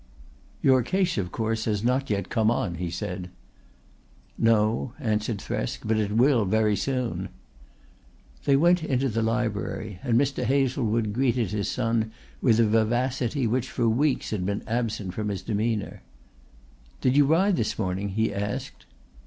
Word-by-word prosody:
"Your 130 -1 +5
case, 180 - 0
of 90 -2 -3
course, 110 0 -2
has 105 -2 -1
not 130 +3 +1
yet 100 -2 -1
come 110 -1 +2
on," 105 -6 0
he 90 - -2
said. 90 0 -5 1.1
"No," 115 +2 +2
answered 110 -3 -1
Thresk, - - -4
"but 110 +1 +1
it 105 -1 0
will 120 0 +4
very 105 +1 +2
soon." 125 +3 -2 1.2
They 140 - +4
went 170 +4 +4
into 135 -3 0
the 115 0 -1
library, 110 -3 -2
and 120 -1 +2
Mr. 140 -2 0
Hazlewood 120 -4 +1
greeted 120 -4 +1
his 105 -1 -1
son 115 -2 0 0.3
with 115 -3 +4
a 115 - +5
vivacity 120 +4 +1
which 125 +3 0
for 120 - 0
weeks 135 +5 +1
had 105 -4 -1
been 100 +2 -2
absent 110 -5 -2
from 105 0 -3
his 100 -3 -4
demeanour. 110 -1 -2 1.0
"Did 130 0 +2
you 145 -1 +5
ride 185 +6 +3
this 110 - -1
morning?" 95 0 -2
he 110 +2 0
asked. 100 +1 -4
115 Hz, 155 wpm, -26 LUFS, 105-130 Hz, 1.2 s, Your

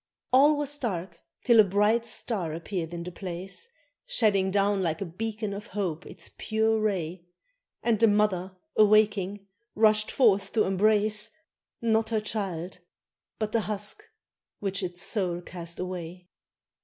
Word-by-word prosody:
All 290 +3 +6
was 290 0 +1
dark 180 -8 -4 0.2
till 235 -2 +5
a - - +10
bright 210 +4 +2
star 185 -9 -3
appeared 170 -1 -4
in 170 -1 -5
the 180 - -6
place, 185 - -5 0.4
Shedding 205 - +2
down 200 0 +2
like 165 -3 -1
a 195 - -3
beacon 215 +4 -4
of 200 +1 -7
hope 185 -4 -3
its - - -6
pure 220 0 +1
ray, 180 -5 -2 0.6
And 230 -3 +2
the 230 - +6
mother 195 -3 +1 0.2
awaking, 205 -2 +3 0.3
rushed 215 0 +4
forth 200 -6 +3
to 220 - +3
embrace 210 +2 +2 0.5
Not 225 -1 +2
her 225 -1 +1
child 190 -5 -4 0.6
but 215 -1 -2
the 230 - +2
husk 210 - -2 0.6
which 195 -1 -2
its 175 -1 -4
soul 180 -5 0
cast 170 -1 -7
away. 180 -1 -6
200 Hz, 145 wpm, -27 LUFS, 180-215 Hz, 0.6 s, a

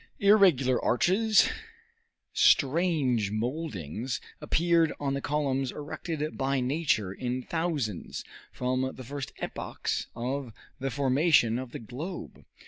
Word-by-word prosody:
Irregular 180 - +4
arches, 205 - +4 0.9
strange 140 - +3
moldings, 115 - -3 0.2
appeared 165 +1 +3
on 140 -1 -1
the 140 - -2
columns 135 -3 0
erected 155 +1 -5
by 135 0 +1
nature 125 - 0
in 125 +3 -3
thousands 150 - -2 0.3
from 130 +1 -1
the 130 - -8
first 135 -3 -5
epochs - - -3
of 125 0 -3 0.3
the 135 +1 -1
formation 135 -3 +3
of 130 -2 -7
the - - -5
globe. 145 - -7
135 Hz, 110 wpm, -28 LUFS, 125-160 Hz, 0.9 s, Irregular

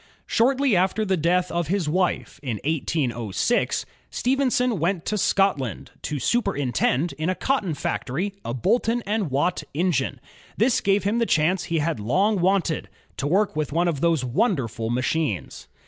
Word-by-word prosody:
Shortly 265 0 +2
after 190 +4 +1
the 190 -1 +1
death 180 +2 +1
of 170 -2 -1
his 185 -2 0
wife 180 -2 -1
in 120 -7 -3
1806, 140 - 0 0.2
Stephenson 250 -4 +1
went 170 +1 0
to 215 - -1
Scotland, 185 - 0
to 150 - -3
superintend, 145 - 0
in 160 +3 0
a 185 - 0
cotton 205 - 0
factory, 175 +8 -2
a 115 - -4
Boulton 230 - +1
and 205 -4 -1
Watt 145 +7 0
engine. 150 -6 0 0.4
This 230 +3 +3
gave 200 +1 +2
him 210 +4 +1
the 230 - +1
chance 175 +3 +2
he 165 -1 -1
had 160 -4 0
long 190 - +1
wanted, 175 - +1 0.3
to 140 - -2
work 195 +3 +2
with 155 -2 -2
one 170 +4 +1
of 155 -5 -1
those 165 -6 +2
wonderful 125 - 0
machmes. 125 - -2
175 Hz, 155 wpm, -24 LUFS, 145-205 Hz, 0.4 s, This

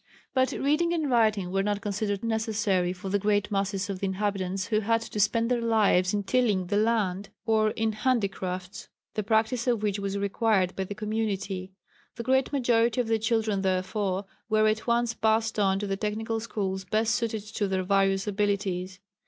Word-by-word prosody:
But 260 0 +2
reading 305 +5 +1
and 310 -5 -1
writing 215 -6 +2
were 195 +1 +1
not 205 0 0
considered 205 0 -2
necessary 215 -5 0
for 185 +1 -6
the 205 +1 +1
great 205 +1 +1
masses 195 0 -1
of 195 -2 -4
the 195 - -1
inhabitants 190 -1 -2
who 215 -2 +2
had 225 +2 +1
to 215 - -6
spend 230 +3 +2
their 240 -1 +1
lives 210 -5 +3
in 205 -1 -1
tilling 210 -4 +1
the 190 - -2
land, 205 -3 +1 0.2
or 220 -1 +3
in 220 +1 -1
handicrafts, 195 -5 -2 0.2
the 215 - -1
practice 225 +3 +1
of 235 -4 +1
which 205 -1 0
was 200 0 -2
required 200 -2 +1
by 190 - -2
the 205 - -6
community. 200 -3 -3 0.4
The 235 - -5
great 260 +2 +2
majority 240 -4 +2
of 245 - +2
the 225 -1 +2
children 220 -2 0
therefore 190 +1 -1 0.2
were 215 0 +4
at 215 +2 0
once 235 0 +2
passed 220 0 +1
on 195 -1 +3
to 205 - -3
the 195 -1 -2
technical 220 +2 -2
schools 195 -4 -3
best 220 +4 +1
suited 225 -3 -1
to 210 -1 -2
their 190 -1 -1
various 195 0 +2
abilities. 195 -3 -1
210 Hz, 185 wpm, -27 LUFS, 195-225 Hz, 0.4 s, were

